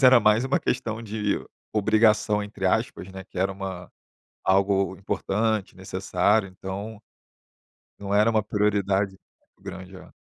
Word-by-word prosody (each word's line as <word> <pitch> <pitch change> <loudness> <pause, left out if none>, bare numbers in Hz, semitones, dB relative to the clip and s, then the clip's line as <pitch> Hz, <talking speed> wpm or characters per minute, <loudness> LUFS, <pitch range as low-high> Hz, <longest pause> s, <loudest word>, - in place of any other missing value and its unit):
inglês - - -7
era 130 -1 +8
mais 105 +3 +4
uma 135 - +2
questão 115 -3 -2
de 105 -1 -1 0.3
"obrigação", 105 0 +3
entre 100 -2 -3
aspas, 105 -2 0
né, 95 -1 -8
que 95 - -9
era 95 +1 +2
uma 95 -2 -6 0.5
algo 95 0 +2
importante, 105 +1 -1
necessário, 95 +2 +1
então, 100 +3 -7 1.0
não 100 0 -5
era 105 +2 +5
uma 110 -1 +2
prioridade 100 -2 +1 0.3
muito - - -34
grande. 95 +1 -8
É. - - -14
100 Hz, 140 wpm, -25 LUFS, 95-110 Hz, 1.0 s, era